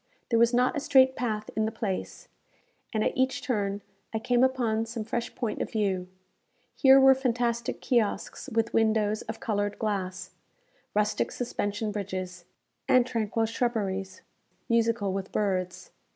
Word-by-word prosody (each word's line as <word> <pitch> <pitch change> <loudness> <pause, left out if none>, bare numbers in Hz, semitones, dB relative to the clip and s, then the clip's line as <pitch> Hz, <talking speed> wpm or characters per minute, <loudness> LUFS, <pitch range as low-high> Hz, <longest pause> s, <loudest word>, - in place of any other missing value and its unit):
There 230 - +4
was 235 0 +5
not 250 +3 +2
a - - 0
straight 260 -1 +4
path 215 -3 -3
in 220 - +1
the 220 - -1
place, 215 -4 -4 0.6
and 215 -2 0
at - - 0
each 260 +1 0
turn 205 -5 -1 0.3
I - - +3
came 245 +2 +2
upon 235 -4 +1
some 225 -1 -4
fresh 235 +2 -4
point 235 -4 -3
of - - -2
view. 195 -5 -1 0.7
Here 270 -1 +7
were 270 0 +8
fantastic 240 -2 -1
kiosks 235 -5 -1
with 225 0 0
windows 215 -1 +2
of 220 +1 -7
coloured 205 -2 -1
glass; 195 -4 -3 0.6
rustic 210 0 +1
suspension 210 -3 -2
bridges; 185 -3 -5 0.4
and 255 -1 +5
tranquil 225 -2 -1
shrubberies, 205 -5 -2 0.4
musical 230 -4 +1
with 195 0 -4
birds. 185 -3 -2
220 Hz, 145 wpm, -28 LUFS, 205-240 Hz, 0.7 s, were